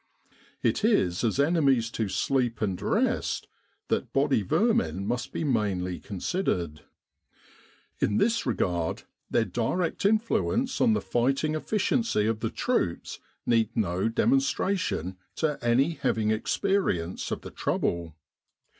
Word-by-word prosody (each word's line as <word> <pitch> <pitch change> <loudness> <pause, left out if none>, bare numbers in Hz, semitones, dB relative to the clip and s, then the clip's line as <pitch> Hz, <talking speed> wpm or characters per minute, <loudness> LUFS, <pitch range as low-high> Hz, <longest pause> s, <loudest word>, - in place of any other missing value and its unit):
It - - +1
is 95 - +2
as 115 +3 +1
enemies 140 -7 +3
to 110 -3 -2
sleep 120 +2 0
and 95 -4 -2
rest - - 0 0.4
that - - -1
body 135 -4 +2
vermin 100 - +1
must 120 +4 -2
be - - -3
mainly 100 - 0
con 100 - -8
sidered. 85 - -1 1.2
In 105 - +1
this 230 +1 +2
regard, 90 -8 -1 0.3
their 115 -2 +2
direct 165 +11 -1
influence 230 +4 +1
on 230 - +5
the - - 0
fighting 135 +5 0
efficiency 205 - 0
of 110 0 0
the - - -1
troops - - -1 0.3
needs 115 -1 +2
no 95 -1 0
demonstra 230 - +2
tion 95 - -3 0.2
to 150 -4 -1
any 125 +7 +3
having 115 -8 0
experience 110 - 0
of - - -3
the - - -9
trouble. 85 -2 -2
120 Hz, 130 wpm, -27 LUFS, -, 1.2 s, on